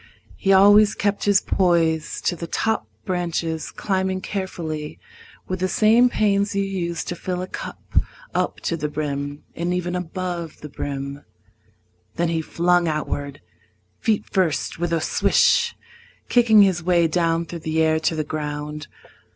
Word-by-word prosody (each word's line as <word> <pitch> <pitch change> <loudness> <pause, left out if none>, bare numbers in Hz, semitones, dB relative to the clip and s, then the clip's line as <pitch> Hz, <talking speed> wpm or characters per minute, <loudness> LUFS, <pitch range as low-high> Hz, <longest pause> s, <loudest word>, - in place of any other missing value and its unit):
He 195 - +1
always 205 +2 +6
kept 205 0 -1
his 205 -1 +5
poise 165 -4 +1
To 175 - 0
the 170 0 -6
top 220 +6 -1 0.2
branches, 170 -3 -2
climbing 190 -1 -1
carefully 165 -7 -4 0.5
With 185 0 -3
the 185 - +1
same 225 +6 +4
pains 200 -2 +1
you 200 - +2
use 175 -4 -3
to 175 - -4
fill 180 +1 -3
a - - -5
cup - - -3 0.3
Up - - -1
to 170 - -1
the 150 -2 -2
brim, 145 -1 -4
and 175 +1 -1
even 180 0 -2
above 180 -2 -4
the 150 - -8
brim. 140 0 -5 0.9
Then 170 0 0
he 165 -1 0
flung 175 +2 +2
outward, 145 -2 -3 0.6
feet 220 -3 +1
first, 175 -4 0
with 175 -1 -1
a 165 -1 +1
swish, 475 - +3 0.5
Kicking 230 -4 +6
his 185 -3 +2
way 170 0 +3
down 165 0 +1
through 170 0 -7
the 160 0 0
air 160 0 +2
to 160 +1 0
the 155 - -1
ground. 150 0 -5
175 Hz, 150 wpm, -22 LUFS, 160-190 Hz, 0.9 s, always